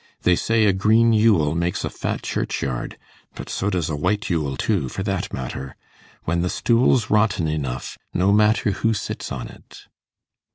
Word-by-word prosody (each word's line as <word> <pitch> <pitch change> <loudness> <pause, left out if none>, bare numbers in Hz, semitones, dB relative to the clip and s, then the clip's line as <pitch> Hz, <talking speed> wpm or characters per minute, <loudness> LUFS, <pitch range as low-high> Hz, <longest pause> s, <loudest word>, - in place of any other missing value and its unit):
They 90 - +4
say 115 +4 +2
a 100 - +4
green 110 +4 +4
Yule 105 -9 +3
makes 85 +1 -1
a - - -2
fat - - -4
churchyard; 65 -3 -3 0.4
but - - -8
so 100 - -1
does 90 -5 -1
a 80 - -2
white 100 +7 -1
Yule 75 -6 -1
too, 65 - 0
for 95 - -4
that 95 -2 -2
matter. 65 +1 -6 0.5
When 85 +1 0
the 90 - 0
stool's 120 +1 +2
rotten 105 -6 +2
enough, 70 -5 -4
no 95 +3 +2
matter 105 0 +3
who 115 +3 0
sits - - -5
on - - -4
it. - - -15
95 Hz, 170 wpm, -22 LUFS, 80-105 Hz, 0.5 s, They